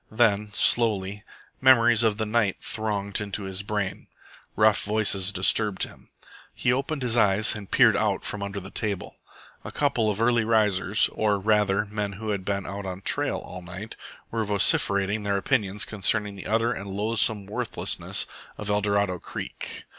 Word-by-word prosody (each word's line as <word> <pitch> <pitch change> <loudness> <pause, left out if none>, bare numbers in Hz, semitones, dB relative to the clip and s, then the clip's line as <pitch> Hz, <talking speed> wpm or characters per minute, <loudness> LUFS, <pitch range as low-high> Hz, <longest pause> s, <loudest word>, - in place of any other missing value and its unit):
Then, 105 -2 +2
slowly, 105 -4 +2 0.4
memories 120 -3 +5
of 110 -3 +2
the 110 - -1
night 105 -3 +1
thronged 105 -2 -2
into 100 0 -4
his 95 0 -4
brain. 100 -1 -3 0.5
Rough 110 -1 +3
voices 105 -3 +1
disturbed 100 +1 +1
him. - - -9 0.5
He 120 - +1
opened 140 +2 -2
his 120 -2 0
eyes 105 -2 +4
and 105 -3 -8
peered - - +5
out - - 0
from 105 - -4
under 100 0 -4
the 95 +1 -10
table. 105 -5 -3 0.5
A - - -6
couple 120 -7 0
of 105 0 -2
early 120 0 +3
risers, 105 -2 +3
or, 105 -2 +1
rather, 105 0 +2
men 105 -1 -4
who 110 +3 -6
had 100 -2 -3
been 100 0 -2
out 100 0 -6
on 95 0 -6
trail - - 0
all 90 - -9
night, 95 +5 -9 0.4
were 115 -1 -1
vociferating 100 0 +2
their 100 -1 0
opinions 105 -3 -1
concerning 105 0 -1
the 95 - -8
utter 115 +2 +1
and 100 0 -7
loathsome 105 +1 0
worthlessness 100 - -2 0.3
of 105 -1 -4
Eldorado 100 -3 0
Creek. - - -7
105 Hz, 160 wpm, -25 LUFS, 100-110 Hz, 0.5 s, memories